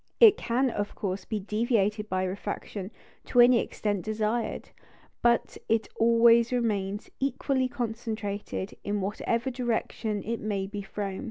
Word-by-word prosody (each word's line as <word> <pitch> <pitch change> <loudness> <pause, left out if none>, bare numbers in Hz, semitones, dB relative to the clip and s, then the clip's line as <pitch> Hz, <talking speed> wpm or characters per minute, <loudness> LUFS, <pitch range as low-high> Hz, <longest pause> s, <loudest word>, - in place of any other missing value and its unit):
It 445 -4 +9
can, 250 +2 0
of 205 -1 -3
course, 190 -2 -3
be 215 - -2
deviated 210 0 0
by 185 0 0
refraction 195 0 -4 0.4
to 245 - +1
any 240 0 +8
extent 205 -5 -2
desired; 220 +2 -2 0.5
but 235 -1 +2
it 225 0 +2
always 230 +1 +5
remains 205 -5 -1
equally 270 -1 0
concentrated, 220 -5 -4
in 205 0 -1
whatever 230 +5 -1
direction 230 -4 -2
it 230 0 -3
may 200 -2 -2
be 205 +1 -5
thrown. 195 -1 -4
220 Hz, 135 wpm, -28 LUFS, 205-235 Hz, 0.5 s, It